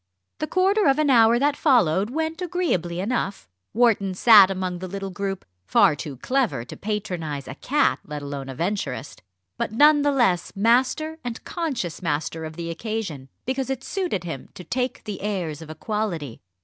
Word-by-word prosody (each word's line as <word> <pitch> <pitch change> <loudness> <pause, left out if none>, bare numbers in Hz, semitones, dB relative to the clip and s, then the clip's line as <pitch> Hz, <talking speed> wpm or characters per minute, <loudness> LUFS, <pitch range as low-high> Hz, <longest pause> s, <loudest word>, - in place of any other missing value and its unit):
The 310 - -2
quarter 385 +2 +3
of 270 0 +4
an 305 -2 +3
hour 230 -1 +6
that 285 +3 +2
followed 210 - +3
went 320 +5 -3
agreeably 310 - -1
enough. 200 - -2 0.2
Wharton 205 -5 +2
sat 205 -2 +8
among 185 -2 -3
the 185 - -5
little 195 +1 -5
group, 195 0 -4 0.2
far - - +5
too 145 -2 -7
clever 250 - 0
to - - -9
patronise 170 -10 -4
a - - -6
cat, 290 - +1
let 150 -1 -6
alone 140 -1 -5
a 135 - -6
Venturist, 165 -6 -3 0.4
but - - -1
none 295 +6 +6
the 290 0 +2
less 215 -11 +1
master 260 +9 +2
and 240 -2 -5
conscious 270 - -3
master 160 0 -2
of 155 0 -8
the 170 0 -4
occasion, 170 - -4 0.2
because 265 +1 -2
it 265 -1 -3
suited 360 - -2
him 160 -6 -6
to 180 - -9
take 250 +5 -2
the 210 -2 -6
airs 180 -7 -3
of 160 - -10
equality. 165 - -3
200 Hz, 175 wpm, -24 LUFS, 165-260 Hz, 0.4 s, sat